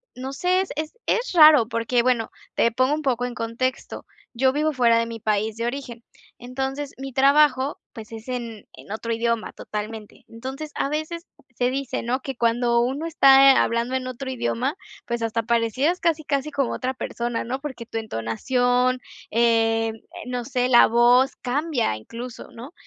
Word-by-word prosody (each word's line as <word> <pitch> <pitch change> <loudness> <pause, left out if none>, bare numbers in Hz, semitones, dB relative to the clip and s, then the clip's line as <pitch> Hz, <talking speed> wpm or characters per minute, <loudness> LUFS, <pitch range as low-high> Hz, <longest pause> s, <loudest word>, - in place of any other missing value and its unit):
no 260 +2 -6
sé, 360 +5 +1 0.2
es 310 +1 -3
es 475 +1 0
raro 305 -8 +7
porque 230 +1 +1
bueno, 240 -3 +1 0.3
te 230 -1 +2
pongo 255 +3 +2
un 310 - -5
poco 245 -3 0
en 245 0 -4
contexto. 235 +3 -3 0.3
Yo 260 +2 +2
vivo 305 +2 0
fuera 235 -3 +4
de 230 - 0
mi 230 -2 -8
país 215 0 0
de 230 - -3
origen. 240 -2 -5 0.3
Entonces, 270 +3 -4
mi 270 0 -7
trabajo, 275 0 +3
pues, 220 -1 -10
es 225 +1 -9
en 235 -4 -6
en - - -13
otro 230 +2 -3
idioma 230 -1 -1
totalmente. 215 0 -7
Entonces, 265 +6 -7
a 275 - -1
veces 315 +3 -4 0.3
se 245 0 +2
dice, 270 0 -3
¿no?, 250 +3 -1
que 270 -1 -5
cuando 235 0 +2
uno 270 +6 -2
está, 275 -4 +7
eh, - - 0
hablando 235 +2 +1
en 255 -1 -2
otro 255 +1 -6
idioma, 255 +2 -2 0.3
pues, 235 -1 -3
hasta 230 0 -1
parecieras 235 - 0
casi, 320 -2 0
casi 280 +1 -1
como 275 -4 -1
otra 255 +1 -2
persona 240 -2 -4
¿no?, 260 +3 -4
porque 260 -5 -7
tu 225 - -6
entonación, 245 - 0 0.3
em, 225 -1 +2
eh, 225 - -18 0.2
no 250 -1 -3
sé, 250 -1 -1
la 240 -2 +7
voz 245 +3 +4
cambia 265 - -1
incluso, 230 - -9
¿no? 245 +7 -11
250 Hz, 175 wpm, -23 LUFS, 230-270 Hz, 0.3 s, raro